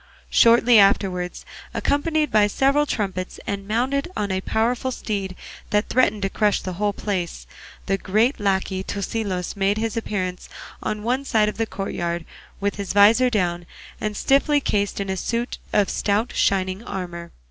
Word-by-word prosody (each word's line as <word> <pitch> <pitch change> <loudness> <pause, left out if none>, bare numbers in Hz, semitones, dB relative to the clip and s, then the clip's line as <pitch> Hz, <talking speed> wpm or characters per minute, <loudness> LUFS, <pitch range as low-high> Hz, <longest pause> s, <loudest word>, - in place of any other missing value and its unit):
Shortly 235 0 +6
afterwards, 185 -3 +2 0.3
accompanied 305 +1 +1
by 210 -1 +5
several 275 +7 +2
trumpets 190 -6 -3
and 200 -1 -4
mounted 260 +7 0
on 205 -2 -1
a 190 0 -1
powerful 235 +6 0
steed 200 -6 -4 0.3
that 210 +1 +1
threatened 215 -5 +2
to 195 - +1
crush 210 -1 +2
the 185 - -5
whole 205 +3 0
place, 185 -4 -4 0.4
the 195 0 0
great 220 +9 +1
lacquey 190 -1 0
Tosilos 200 -2 -3
made 200 +1 +1
his 225 -1 -2
appearance 185 -5 -3 0.3
on 210 0 -3
one 255 +4 0
side 220 -5 +2
of - - -7
the 225 0 0
courtyard 175 -4 -3 0.3
with 200 0 -1
his 200 -2 -3
visor 220 +5 +6
down 175 -6 -1 0.3
and 210 -1 -2
stiffly 285 +2 +3
cased 205 -7 -1
in 200 - -2
a 190 - -1
suit 235 +6 -3
of 205 -2 +3
stout 210 +4 0
shining 190 +1 +1
armour. 175 -5 -6
205 Hz, 160 wpm, -23 LUFS, 190-230 Hz, 0.4 s, Shortly